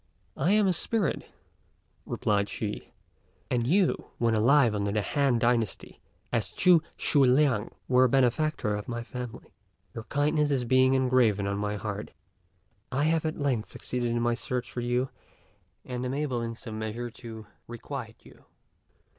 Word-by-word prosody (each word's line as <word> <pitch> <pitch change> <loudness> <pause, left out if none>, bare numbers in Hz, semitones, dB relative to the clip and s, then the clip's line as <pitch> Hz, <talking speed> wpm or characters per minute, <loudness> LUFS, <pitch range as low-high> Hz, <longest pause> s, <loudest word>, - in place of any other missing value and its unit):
"I 170 +9 +2
am 210 -1 +4
a 185 - +3
spirit," 200 +1 -1 0.8
replied 100 -1 0
she; 105 -2 -5 0.6
"and 120 -2 +1
you, 185 +5 +2
when 115 -1 +1
alive 120 +2 +4
under 100 -1 -1
the 105 0 0
Han 140 -2 +1
dynasty 115 -2 -1 0.3
as - - 0
Ch'u 175 -3 +5 0.2
Sui 140 -3 +3
liang, 130 -5 +3 0.2
were 130 0 +5
a - - +2
benefactor 135 -2 +1
of 105 0 -6
my 120 -1 -4
family. 125 -1 -8 0.4
Your 115 - -7
kindness 145 -2 +1
being 130 +2 +4
engraven 125 -6 +3
on 100 0 -1
my 105 0 -1
heart, 105 0 -5 0.8
I 135 +4 0
have 160 +1 +1
at 155 - -3
length 130 -7 -1
succeeded 125 -1 -3
in 120 0 0
my 120 0 +2
search 125 +1 -3
for 120 - -4
you, 125 +2 0 0.8
and 125 -1 -4
am 130 +1 -2
able 140 -5 -1
in 115 0 -4
some 110 -2 -6
measure 115 +2 -4
to 115 -3 -9 0.2
requite 120 -1 -7
you." - - -18
125 Hz, 155 wpm, -28 LUFS, 110-140 Hz, 0.8 s, Ch'u